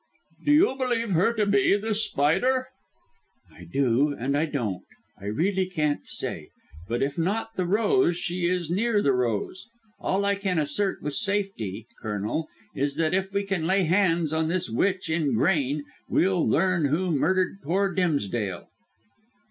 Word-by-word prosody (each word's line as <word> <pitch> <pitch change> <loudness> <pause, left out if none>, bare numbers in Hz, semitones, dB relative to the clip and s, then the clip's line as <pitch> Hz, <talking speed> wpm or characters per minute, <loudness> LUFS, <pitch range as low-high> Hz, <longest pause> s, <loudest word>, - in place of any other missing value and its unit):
"Do 295 - +2
you 300 -1 +5
believe 235 -4 0
her 185 +6 +3
to 215 -2 +1
be 200 0 +3
this 215 +1 0
Spider?" 255 - +1 0.8
"I 85 - -13
do, 135 - +1
and 135 +4 -1
I 150 +3 +2
don't. 115 - -3 0.4
I 100 - -11
really 185 - 0
can't 150 - -1
say. - - -5 0.4
But 120 +3 -1
if 140 +3 -2
not 220 +6 -1
the 185 -2 -1
rose, 195 -3 +2
she 175 0 -1
is 175 -2 -1
near 210 +2 +1
the 140 - +3
rose. 125 - -2 0.3
All 195 +1 0
I 200 - +3
can 195 -3 -1
assert 190 +6 -1
with 145 0 -3
safety, 195 - -1 0.2
Colonel, 105 +9 -2 0.3
is 140 +1 -1
that 160 +1 0
if 190 +1 0
we 200 +1 0
can 195 -5 -2
lay 190 +1 +3
hands 170 -3 +2
on 160 0 +1
this 170 -6 -1
witch 185 - 0
in 160 -6 0
grain 145 +1 +1 0.3
we'll 185 -2 +2
learn 180 -2 +2
who 170 +6 0
murdered 185 +5 +1
poor 190 +6 0
Dimsdale." 120 - -1
175 Hz, 160 wpm, -26 LUFS, 140-195 Hz, 0.8 s, you